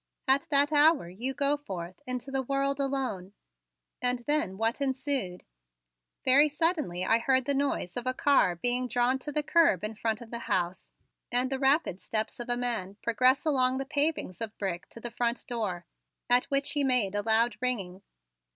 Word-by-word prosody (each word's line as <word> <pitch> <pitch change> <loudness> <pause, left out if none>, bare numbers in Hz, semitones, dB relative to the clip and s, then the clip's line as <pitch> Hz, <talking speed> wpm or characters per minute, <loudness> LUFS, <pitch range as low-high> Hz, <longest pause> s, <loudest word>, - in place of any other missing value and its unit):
"At 270 +1 +3
that 285 +1 +3
hour 295 - +4
you 240 +9 -5
go 280 +2 +1
forth 185 -7 -8
into 255 +1 -3
the 270 0 0
world 275 +1 -1
alone." 260 -9 -2 0.7
And 250 0 +1
then 290 -11 0
what 225 +5 0
ensued? 265 -8 -2 0.8
Very 280 +4 +6
suddenly 295 - -1
I 225 +3 +3
heard 260 +1 +2
the 285 - 0
noise 275 -10 -1
of 245 +1 -4
a 255 - +1
car 270 -12 +3
being 245 +7 -1
drawn 245 +2 +1
to 295 - -5
the 300 +1 -1
curb 295 - +3
in 215 +1 -3
front 220 0 -2
of 235 -2 -12
the 235 - -4
house 180 +1 -1 0.4
and 250 +2 +1
the 265 - -1
rapid 270 - +2
steps 220 +1 -3
of 240 +1 -6
a 240 - +1
man 230 -6 -2
progress 255 +5 +3
along 260 -4 +2
the 270 - -3
pavings 285 - -1
of 225 -1 -5
brick 185 -3 -4
to - - -11
the 240 +1 -6
front 235 0 -1
door, 200 -8 -3 0.5
at 245 +1 +5
which 275 0 +1
he 290 -2 +1
made 250 -7 +2
a 205 - 0
loud 225 +2 +2
ringing. 195 -7 -2
250 Hz, 185 wpm, -28 LUFS, 215-275 Hz, 0.8 s, Very